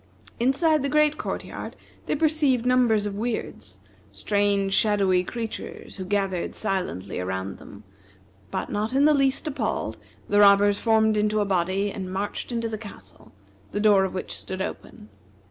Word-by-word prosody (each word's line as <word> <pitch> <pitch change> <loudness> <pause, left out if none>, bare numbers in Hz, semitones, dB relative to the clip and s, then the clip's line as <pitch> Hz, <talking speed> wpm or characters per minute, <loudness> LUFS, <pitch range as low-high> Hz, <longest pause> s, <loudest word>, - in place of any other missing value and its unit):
Inside 300 +5 +3
the 280 - -1
great 300 +1 +3
court - - -4
yard - - -7 0.3
they - - +1
perceived 295 -5 +2
numbers 245 -4 +3
of 205 - -3
Weirds 225 +3 -5 0.3
strange 200 -1 0
shadowy 195 -4 +3
creatures 225 +2 -6
who 190 - -5
gathered 195 -2 -1
silently 180 - -3
around 95 +1 -4
them; 100 +1 -13 0.7
but - - -4
not 215 +4 -2
in 275 +2 +4
the 305 - +6
least 275 +1 +1
appalled, 300 -2 -2 0.3
the 205 - +3
robbers 205 0 +6
formed 220 -1 +3
into 210 0 +1
a 205 - +1
body, 190 +1 0
and 190 -2 -6
marched 200 +5 -4
into 230 -1 -1
the 220 -1 -5
castle, 95 - -11 0.4
the 205 - -1
door 205 -2 +5
of 190 - -3
which 185 - -4
stood 185 0 -6
open. 110 - -7
205 Hz, 160 wpm, -25 LUFS, 190-240 Hz, 0.7 s, the